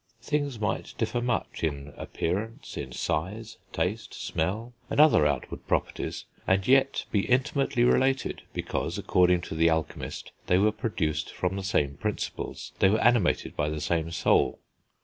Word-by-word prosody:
Things 145 -4 -1
might 105 -2 -2
differ 120 - -1
much 120 -7 -2
in 70 -2 -2
appearance, 105 +7 -3
in 65 -2 -5
size, 100 - -3
taste, 90 +7 -2
smell, 105 +9 -2 0.2
and - - -1
other 145 - +7
outward 70 -4 -3
properties, - - -2 0.2
and 95 0 +2
yet 135 +1 +4
be 100 -2 +1
intimately 130 -1 +2
related, 130 +1 +2
because, - - -3
according 90 -1 +3
to - - -6
the 80 +1 +4
alchemist, 80 -1 -3 0.2
they 90 - +4
were 105 +3 +4
produced 80 - -2
from 90 +1 -2
the 100 - -3
same 70 -7 0
principles, 105 -1 -4
they 95 - +6
were 110 +3 +2
animated 120 -6 +2
by 75 0 0
the 75 0 -3
same 80 +2 0
soul. 85 - +2
95 Hz, 150 wpm, -28 LUFS, 80-120 Hz, 0.2 s, other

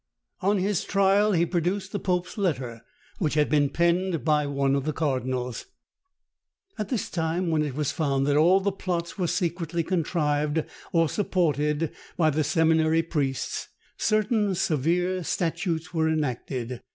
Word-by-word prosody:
On 200 +2 +2
his 195 0 0
trial 200 +1 +3
he 170 -1 +3
produced 185 +3 -1
the 205 - -2
pope's 180 -1 -1
letter, 130 - -2 0.4
which 155 -5 0
had 150 -1 +3
been 145 -2 +3
penned 170 0 +1
by 150 -2 +2
one 140 -1 +1
of 140 -1 +1
the 155 +1 -2
cardinals. 130 -4 -2 1.1
At 210 -1 -3
this 240 -6 -1
time, 165 +1 -1
when 155 -1 +2
it 145 -4 -2
was 150 -1 0
found 140 -5 0
that 145 0 +2
all 175 +6 +5
the 200 +1 +1
plots 180 -1 -3
were 180 - +1
secretly 170 -1 -1
contrived 155 -3 0 0.3
or 165 -3 +3
supported 155 -4 0 0.3
by 160 -2 +3
the 155 +2 +1
seminary 160 +1 +3
priests, 140 -5 -2 0.3
certain 215 -2 +1
severe 175 +4 0
statutes 170 0 -2
were 160 -1 +2
enacted. 130 -5 -2
165 Hz, 150 wpm, -26 LUFS, 150-185 Hz, 1.1 s, all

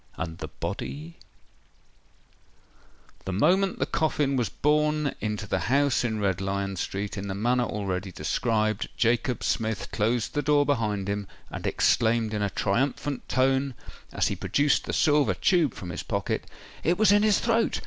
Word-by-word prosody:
And 80 0 -5
the - - -5
body—— 75 +5 -6 2.1
The 95 - -3
moment 185 - +2
the - - 0
coffin 150 -3 0
was 120 -6 0
borne 150 +3 +1
into 105 0 -2
the 100 - -1
house 140 -1 +3
in 110 -3 -1
Red 95 -3 0
Lion 100 0 -2
Street, 100 +3 -3
in 100 - -5
the 95 - -3
manner 120 +4 +1
already 95 -3 -3
described, 110 +6 0
Jacob 120 +2 +1
Smith 110 -2 -1
closed 115 +2 0
the 145 - 0
door 145 0 +3
behind 105 -8 0
him, 100 -1 -2 0.2
and - - -4
exclaimed 115 -1 +2
in 105 - -1
a 100 - +1
triumphant 130 +8 -1
tone, 135 0 +1 0.4
as - - +1
he - - -2
produced 145 0 +1
the - - -4
silver 150 -2 +3
tube 170 - +2
from 90 -2 -7
his - - -4
pocket, - - -2 0.4
"It 170 +2 +2
was 215 -1 +5
in 205 0 +5
his 215 -1 +4
throat! 230 -1 +1
115 Hz, 160 wpm, -26 LUFS, 100-145 Hz, 2.1 s, was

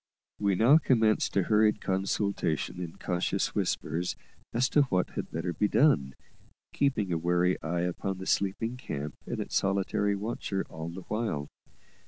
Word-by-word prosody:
We 100 -2 +2
now 125 - +6
commenced 110 -8 +2
a 95 - +4
hurried 105 +2 +3
consultation 95 -3 -1
in 85 -2 -6
cautious 90 -1 -1
whispers 85 +2 -1 0.4
as 125 +3 +2
to 150 - +4
what 90 -3 +1
had - - -4
better 85 +2 -3
be 105 +6 +1
done, 70 - +3 0.6
keeping 110 -10 +1
a 80 - 0
wary 90 +2 +1
eye 85 +1 -1
upon 90 +2 -2
the 95 - -7
sleeping 110 +6 0
camp 75 - -5
and - - -3
its - - -5
solitary 100 +1 +1
watcher 100 -2 -3
all 80 +1 -5
the 90 +3 -7
while. 105 -8 -3
95 Hz, 155 wpm, -29 LUFS, 85-110 Hz, 0.6 s, now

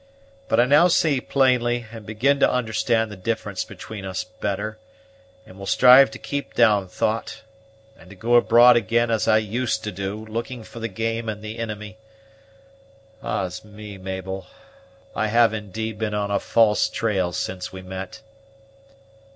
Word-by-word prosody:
But 110 - +2
I 120 - +6
now 145 +7 +5
see 155 -6 +2
plainly, 120 -3 +1
and 110 -3 -10
begin 130 +7 +1
to - - +4
understand 115 -2 0
the - - -7
difference 100 -1 -3
between 100 +1 -9
us 95 +1 -3
better, 110 0 -4 0.7
and 95 - -15
will 100 - -7
strive 125 +5 +7
to - - -9
keep 140 0 -5
down 105 -5 +4
thought, 110 +4 -3 0.6
and 90 - -16
to 100 - -12
go 115 +5 -1
abroad 120 +1 +7
again 120 +1 +1
as 110 - 0
I 110 - +5
used 110 +3 -1
to 105 - -3
do, 100 +3 -5
looking 115 +2 -5
for 115 - -11
the 115 - -3
game 115 +2 -3
and 105 0 -6
the 110 +1 -6
inimy. 105 -1 -6 1.2
Ah's 90 -1 -3
me, 105 -1 -11
Mabel! 95 0 -6 0.7
I 110 - 0
have 115 0 +4
indeed 110 +1 -5
been 105 -1 -2
on 100 -1 -2
a 100 - +1
false 110 -2 +3
trail 95 -6 -1
since 90 +1 -4
we 95 0 -9
met." 95 +1 -8
110 Hz, 160 wpm, -23 LUFS, 100-115 Hz, 1.2 s, strive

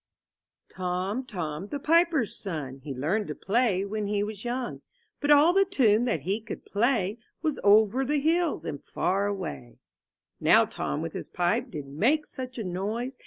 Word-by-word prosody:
TPOM, 185 +7 -2
Tom, 175 -3 -4
the 285 - -4
piper^s 325 - +3
son, 150 -9 -5
■ - - -25
He. 140 - -7
learned 160 +11 -1
to - - -5
play 200 -2 +1
when 210 0 -3
he 205 0 0
was 210 -1 -6
youngs 245 0 -3 0.4
But 290 - -2
all 295 +4 +7
the 390 +1 +5
tune 245 - +3
that 165 - 0
he 195 +8 -1
could 225 - -8
play, 215 -1 +1 0.2
Was 310 -3 0
Over 215 +5 +5
the 290 +2 +1
hills 330 +2 +1
and 145 -2 -5
far 195 +3 0
away/' 70 - -5 0.6
Now - - +5
Tom 70 - -3
with - - -5
his - - -6
pipe 175 -1 0
did 150 -4 -6
make 235 - +1
such 255 -1 -7
a 225 - -3
noise. 210 +8 -3
210 Hz, 175 wpm, -27 LUFS, 180-260 Hz, 0.6 s, all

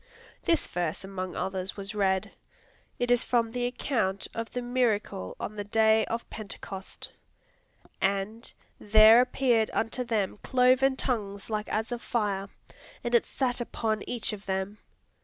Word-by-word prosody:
This 330 -3 +2
verse 175 -1 -2
among 185 -1 -5
others 190 0 -3
was 200 +1 -5
read: 190 -2 +1 0.7
it 245 0 0
is 245 0 +4
from 230 -2 +1
the 245 0 -1
account 225 -6 -1
of 230 0 -4
the 250 - -3
miracle 230 - 0
on 215 - -5
the 205 - -2
day 220 +1 +4
of 230 +1 -4
Pentecost: 195 -2 -7 0.9
"And 200 +4 -1 0.3
there 215 +2 +8
appeared 250 -3 +2
unto 230 +3 0
them 215 -5 -1
cloven 255 +3 +3
tongues 210 -6 -3
like 210 0 -2
as 220 +3 -1
of 240 -1 -3
fire, 200 -4 -1 0.5
and 240 - -2
it 235 - +4
sat 250 -2 -1
upon 220 -2 -1
each 235 -2 -1
of 205 -1 -9
them." 190 +2 -2
220 Hz, 145 wpm, -28 LUFS, 195-245 Hz, 0.9 s, there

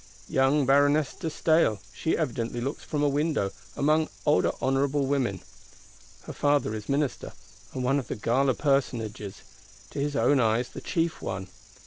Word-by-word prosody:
Young 135 +2 +2
Baroness 145 +2 +3
de 165 - -6
Staël—she 155 - +1
evidently 120 -6 -2
looks 135 +5 -4
from 150 -1 -2
a - - +4
window; 145 -8 0 0.2
among 155 +2 +2 0.2
older 150 - +3
honourable 135 +1 +1
women. 130 -9 0 0.8
Her - - -8
father 145 -6 +1
is 105 -1 -6
Minister, 140 -1 -1 0.4
and 130 - -2
one 135 +3 +2
of 130 - -6
the - - -3
gala 130 +4 +1
personages; 115 -8 -1 0.5
to - - -5
his 145 +1 -1
own 145 0 +3
eyes 115 +1 +2
the - - -9
chief 165 -1 -1
one. 95 0 -4
140 Hz, 150 wpm, -27 LUFS, 120-145 Hz, 0.8 s, a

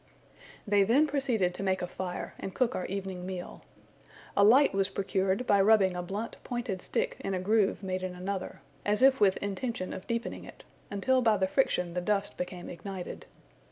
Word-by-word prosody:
They 205 -2 +3
then 240 +10 +4
proceeded 250 -11 0
to - - -6
make 190 -2 0
a - - -2
fire, 180 0 -5
and 190 - -6
cook 255 -1 +1
our 185 - -3
evening 190 -2 -4
meal. 180 -1 -6 0.7
A 200 - +5
light 255 +8 +6
was 195 0 +1
procured, 195 +3 0
by 200 -4 +4
rubbing 195 -3 +4
a 180 - -2
blunt 200 +6 -5
pointed 240 -7 -3
stick - - -1
in 195 - -2
a - - -1
groove 205 +1 +2
made 185 -1 -2
in 185 -1 -4
another, 185 +1 -4 0.2
as 210 +4 +2
if 265 -3 +5
with 195 -2 +5
intention 200 0 -3
of 190 - -8
deepening 235 0 -3
it, - - -12 0.3
until 255 +6 +2
by 220 -3 +4
the 190 - +2
friction 185 -5 +1
the 180 - -1
dust 205 +2 0
became 180 0 -5
ignited. 185 0 -7
195 Hz, 190 wpm, -30 LUFS, 185-225 Hz, 0.7 s, light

